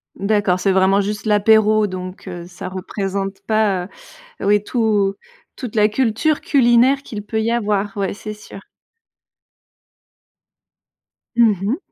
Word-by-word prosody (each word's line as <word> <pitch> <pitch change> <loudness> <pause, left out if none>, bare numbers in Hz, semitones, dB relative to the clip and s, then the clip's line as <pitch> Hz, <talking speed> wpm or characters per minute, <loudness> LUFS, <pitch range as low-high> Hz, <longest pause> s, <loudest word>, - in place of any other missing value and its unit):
D'accord, 200 -2 +1
c'est 195 - +1
vraiment 190 +1 +3
juste 205 +1 -4
l'apéro 215 0 +4
donc, 185 +1 -8
heu, 175 -2 -7
ça 180 +1 -8
représente 195 +1 -4
pas, 210 -5 +1 0.6
heu, - - -3
oui, 205 0 +3
tout 210 -4 +1 0.4
toute 240 -4 -7
la 210 0 +5
culture 260 +6 0
culinaire 260 +1 +3
qu'il 210 -2 -7
peut 220 +2 -3
y 225 - 0
avoir, 205 -3 -1
ouais, 195 -1 -1
c'est 215 +1 -7
sûr. 210 -1 -12 2.8
Mmh 230 -4 +4
mh. 230 +9 0
210 Hz, 130 wpm, -19 LUFS, 195-220 Hz, 2.8 s, la